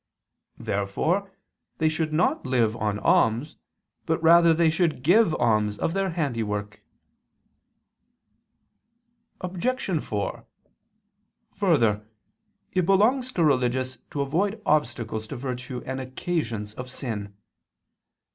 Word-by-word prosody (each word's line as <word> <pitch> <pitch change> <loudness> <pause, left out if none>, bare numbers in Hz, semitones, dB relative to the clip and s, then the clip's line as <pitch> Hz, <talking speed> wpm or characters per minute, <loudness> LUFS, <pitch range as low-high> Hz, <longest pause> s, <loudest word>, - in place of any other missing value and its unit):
Therefore 155 - -1 0.5
they 160 - +2
should 155 0 -1
not 160 +4 +1
live 120 -4 +1
on 105 -2 -1
alms, 145 - +2 0.5
but 160 0 +1
rather 165 0 +6
should 170 +1 +2
they - - -15
give 180 - +4
alms 105 -3 +1
of 165 - -1
their 195 0 0
handiwork. 110 - -3 2.6
Obj. 185 - -1
4: 105 -1 -3 1.1
Further, 120 - +2 0.7
it 180 -2 +1
belongs 245 +7 +3
to 170 - +1
religious 130 -2 +1
to 145 - -3
avoid 190 +10 0
obstacles 115 -6 0
to 140 - -6
virtue 125 0 -5
and 130 0 -4
occasions 125 -6 -3
of 125 +2 -7
sin. 105 -6 -5
140 Hz, 105 wpm, -25 LUFS, 115-175 Hz, 2.6 s, rather